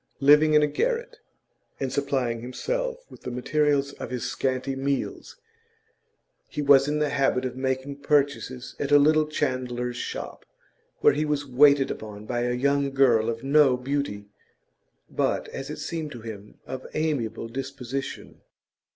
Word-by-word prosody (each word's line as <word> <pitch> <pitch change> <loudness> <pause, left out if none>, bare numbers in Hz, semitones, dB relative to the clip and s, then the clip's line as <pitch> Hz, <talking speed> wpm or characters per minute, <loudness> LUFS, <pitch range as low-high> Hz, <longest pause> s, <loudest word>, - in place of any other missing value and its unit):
Living 150 +2 +6
in 150 - +6
a - - +4
garret, 475 - -2 0.6
and 130 -2 -2
supplying 130 -5 -1
himself - - -3
with - - -13
the - - -5
materials 140 +2 +1
of - - -5
his 125 -2 -3
scanty 135 0 -1
meals, 135 - -3 1.1
he - - -7
was 140 -1 +6
in 150 +1 0
the 150 -1 +1
habit 135 -2 +1
of 125 - -4
making 130 +1 -2
purchases 140 -3 0
at 140 0 -2
a 145 - +8
little 155 +1 +4
chandler's 125 -4 -2
shop, - - -6 0.6
where - - +6
he 150 +2 0
was 150 -1 -1
waited 140 +1 +5
upon 105 -1 -8
by 120 +1 -2
a 120 0 0
young 140 +2 +1
girl 125 -5 +3
of 115 +1 -4
no 140 -2 +4
beauty, 125 -6 -3 0.8
but, - - -1
as - - -6
it - - -5
seemed 160 -3 -4
to 120 - -9
him, 105 -2 -9
of 130 0 -7
amiable 130 -8 -1
disposition. 135 +1 -6
135 Hz, 150 wpm, -26 LUFS, 125-145 Hz, 1.1 s, a